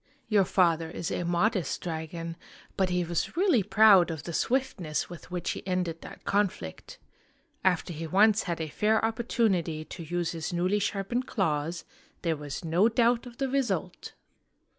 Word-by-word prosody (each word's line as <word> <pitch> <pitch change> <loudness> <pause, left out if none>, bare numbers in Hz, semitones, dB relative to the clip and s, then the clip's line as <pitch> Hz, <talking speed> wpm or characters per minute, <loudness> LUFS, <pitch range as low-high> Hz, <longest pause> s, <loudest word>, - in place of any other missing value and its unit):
Your 205 -3 +4
father 165 -3 +2
is 170 0 -4
a - - -1
modest 175 +2 0
dragon, 165 0 -5 0.4
but 190 -1 +1
he 180 0 +1
was 170 - -2
really 355 - +4
proud 205 -2 +6
of 160 -3 -5
the 170 - -6
swiftness 185 - -1
with 175 - -10
which 180 -1 -2
he - - -5
ended 180 -3 -1
that - - -11
conflict. 200 - -2 0.7
After 180 -2 +1
he 165 +1 -5
once 210 +5 +4
had 170 -3 -3
a 160 - -2
fair 220 +6 +2
opportunity 210 -9 0
to 170 - -9
use 175 +1 -2
his 165 -2 -4
newly 180 +4 +1
sharpened 205 +5 -2
claws, 165 -4 -1 0.4
there 165 -2 +1
was 145 +2 -6
no 175 +7 +3
doubt 235 +1 +2
of 235 -1 -12
the 270 - 0
result! 270 -1 -2
180 Hz, 160 wpm, -28 LUFS, 165-215 Hz, 0.7 s, proud